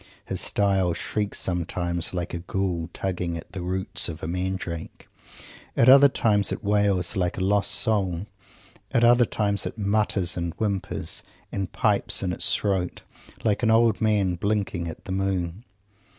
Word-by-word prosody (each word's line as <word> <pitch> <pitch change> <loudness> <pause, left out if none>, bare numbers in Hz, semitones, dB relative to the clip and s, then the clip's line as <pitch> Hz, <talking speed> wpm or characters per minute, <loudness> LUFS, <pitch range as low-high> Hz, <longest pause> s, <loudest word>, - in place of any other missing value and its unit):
His - - 0
style 95 -3 +2
shrieks 105 +4 -2
sometimes 85 -1 -1
like 90 -2 -4
a 85 - -3
ghoul 90 -2 -2
tugging 90 -3 -3
at 80 - -10
the 95 - -6
roots 95 +2 -2
of 80 -1 -8
a - - -2
mandrake. 90 -2 -4 0.7
At 115 - +6
other 140 +2 +9
times 105 -6 +2
it - - -4
wails 100 -3 +1
like 90 -2 -1
a - - -2
lost 100 +1 +2
soul. 100 -4 0 0.7
At 120 - +2
other 120 +1 +6
times 100 -2 0
it - - -8
mutters, 100 -3 +1
and 85 -1 -3
whimpers, 100 -3 -1 0.3
and 95 -2 -3
pipes 105 -4 +2
in 90 -1 -1
its - - -1
throat, 95 -3 -1 0.4
like 105 -1 +1
an 115 - +2
old 115 0 +4
man 105 -4 +2
blinking 100 -3 -1
at 80 - -8
the - - -6
moon. 95 +1 -2
95 Hz, 160 wpm, -25 LUFS, 90-105 Hz, 0.7 s, other